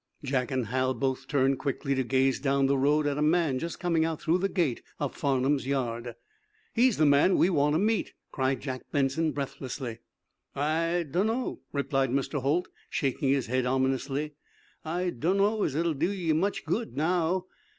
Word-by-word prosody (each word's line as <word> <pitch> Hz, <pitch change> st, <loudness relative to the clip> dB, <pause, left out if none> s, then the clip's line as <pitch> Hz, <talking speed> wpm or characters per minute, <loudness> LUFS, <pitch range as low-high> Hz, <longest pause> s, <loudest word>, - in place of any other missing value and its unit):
Jack 130 Hz, -2 st, 0 dB
and 130 Hz, -3 st, -1 dB
Hal 130 Hz, +3 st, 0 dB
both 135 Hz, +1 st, -2 dB
turned 135 Hz, -1 st, +2 dB
quickly 140 Hz, -1 st, -1 dB
to 130 Hz, -1 st, +1 dB
gaze 130 Hz, +1 st, +2 dB
down 140 Hz, -1 st, +2 dB
the 140 Hz, +1 st, +3 dB
road 145 Hz, +3 st, +2 dB
at 145 Hz, 0 st, 0 dB
a -, -, 0 dB
man 155 Hz, -4 st, +2 dB
just 170 Hz, +3 st, -5 dB
coming 170 Hz, -2 st, +1 dB
out 160 Hz, -1 st, -1 dB
through 170 Hz, +2 st, +1 dB
the 195 Hz, +2 st, 0 dB
gate 165 Hz, -12 st, 0 dB, 0.2 s
of 145 Hz, -3 st, -2 dB
Farnum's 135 Hz, -1 st, 0 dB
yard. 120 Hz, -3 st, -2 dB, 0.6 s
"He's 245 Hz, -1 st, +3 dB
the 155 Hz, -, +4 dB
man 145 Hz, +6 st, +5 dB
we 185 Hz, -, +4 dB
want 150 Hz, -2 st, +2 dB
to -, -, +3 dB
meet," 215 Hz, +2 st, 0 dB, 0.2 s
cried 130 Hz, -2 st, 0 dB
Jack 130 Hz, -2 st, -4 dB
Benson, 145 Hz, +3 st, +1 dB
breathlessly. 135 Hz, -4 st, -5 dB, 0.6 s
"I 165 Hz, +4 st, +1 dB
dunno," 220 Hz, -, -1 dB
replied 135 Hz, -2 st, 0 dB
Mr. 140 Hz, +2 st, -1 dB
Holt, 155 Hz, +7 st, +1 dB, 0.2 s
shaking 135 Hz, -1 st, 0 dB
his 135 Hz, -2 st, +2 dB
head, 125 Hz, +1 st, 0 dB
ominously. 135 Hz, +3 st, 0 dB, 0.5 s
"I 175 Hz, +3 st, -1 dB
dunno 195 Hz, -, +1 dB
as 145 Hz, -, 0 dB
it'll 165 Hz, +1 st, +1 dB
do 155 Hz, +5 st, 0 dB
ye 180 Hz, -5 st, 0 dB
much 190 Hz, +6 st, 0 dB
good, 230 Hz, 0 st, -2 dB
now. 175 Hz, +3 st, +1 dB
145 Hz, 175 wpm, -28 LUFS, 135-165 Hz, 0.6 s, man